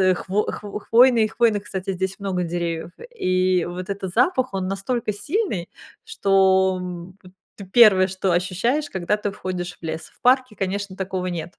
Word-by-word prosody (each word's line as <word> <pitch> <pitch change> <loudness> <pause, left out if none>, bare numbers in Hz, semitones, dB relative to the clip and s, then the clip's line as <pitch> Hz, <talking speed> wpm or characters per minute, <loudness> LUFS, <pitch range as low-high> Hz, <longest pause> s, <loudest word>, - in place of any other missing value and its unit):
э, 185 -1 +4
хв - - -8 0.2
хво 205 0 -7
хвойный, 235 0 +5
и - - 0
хвойных, 215 -3 +1
кстати, 195 -1 -4
здесь 190 +1 -3
много 190 -3 -2
деревьев. 170 -1 -3 0.2
И 185 - +1
вот 180 +1 -6
этот 195 -1 -4
запах, 255 - +2
он 190 -1 -2
настолько 210 +3 -2
сильный, 210 - -2 0.4
что, 190 -1 +3
б 180 +1 -9 0.3
т 200 - -9
1, 200 -6 +7
что 190 0 -1
ощущаешь, 215 - 0
когда 190 +2 -1
ты 210 -1 -3
входишь 180 -3 -5
в - - -45
лес. 160 0 -5
В - - -30
парке, 255 -3 +3
конечно, 195 0 -3
такого 190 -1 -3
нет. 175 0 -5
190 Hz, 170 wpm, -22 LUFS, 180-210 Hz, 0.4 s, 1